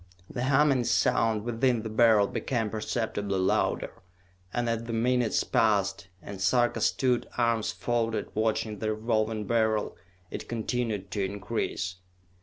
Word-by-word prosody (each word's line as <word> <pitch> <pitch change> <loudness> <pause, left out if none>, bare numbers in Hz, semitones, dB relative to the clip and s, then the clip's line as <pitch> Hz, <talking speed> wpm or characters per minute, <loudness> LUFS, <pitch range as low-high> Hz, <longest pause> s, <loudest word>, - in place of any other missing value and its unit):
The 125 - -3
humming 135 -2 +3
sound 115 -3 +2
within 120 0 +1
the 110 - -4
Beryl 110 -2 +5
became 115 0 -2
perceptibly 105 -3 -2
louder, 95 0 +1 0.6
and 120 +2 -1
as 115 0 -1
the 115 - -4
minutes 120 0 +1
passed, 100 -5 +1 0.2
and 100 -1 -8
Sarka 120 +4 +2
stood, 125 -2 +1
arms 115 -2 +1
folded, 115 -2 -1
watching 110 -1 -1
the 110 -1 -1
Revolving 110 -1 -1
Beryl, 110 -2 +1 0.4
it - - -6
continued 110 -4 -2
to 100 +1 -1
increase. 95 -2 -3
115 Hz, 130 wpm, -28 LUFS, 105-120 Hz, 0.6 s, Beryl